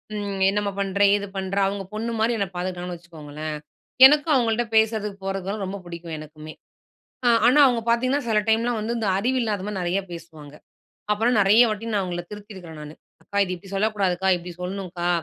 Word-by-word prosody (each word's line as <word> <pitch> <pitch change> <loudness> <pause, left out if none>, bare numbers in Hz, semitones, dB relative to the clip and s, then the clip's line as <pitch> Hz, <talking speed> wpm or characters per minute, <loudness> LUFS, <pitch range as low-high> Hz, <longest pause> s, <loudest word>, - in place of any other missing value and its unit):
ம் 200 -2 -4
என்னம்மா 205 0 -1
பண்ணுற, 200 0 -1
ஏது 200 0 -3
பண்ணுற? 190 +1 -3
அவங்க 195 0 -3
பொண்ணு 225 +2 -3
மாதிரி 230 +2 +2
என்ன 200 - -1
பார்த்துக்கிட்டாங்கன்னு 180 0 -4
வச்சுக்கோங்களேன். 155 -2 -7 0.5
எனக்கும் 295 +2 +5
அவங்கள்ட்ட 235 -1 +1
பேசதுக்கு, 215 -2 +1
போறதுக்குலாம் 195 +1 -3
ரொம்ப 195 +2 -5
பிடிக்கும் 170 -1 -7
எனக்குமே. 155 0 -10 0.9
ஆனா, 265 +4 +5
அவங்க 240 -2 0
பார்த்தீங்கன்னா, 255 +4 +1
சில 215 -1 +3
டைம்லாம் 230 +1 +1
வந்து 225 +3 -2
இந்த 220 - -1
அறிவு 250 +6 0
இல்லாத 210 -4 -2
மாதிரி 210 -2 -4
நெறையா 180 +3 0
பேசுவாங்க. 160 -4 -10 0.6
அப்புறம் 230 +3 +1
நெறைய 210 +5 +6
வாட்டி 220 +2 -4
நான் 205 - +2
அவங்கள 175 -1 -4
திருத்தியிருக்கறேன் 190 -6 -10
நானு. 150 +1 -10 0.3
அக்கா 200 - -6
இது 185 - -4
இப்படி 195 +2 -12
சொல்லக்கூடாதுக்கா, 195 -3 0
இப்படி 175 0 -9
சொல்லணுக்கா, 180 -2 -4
200 Hz, 170 wpm, -24 LUFS, 175-220 Hz, 0.9 s, நெறைய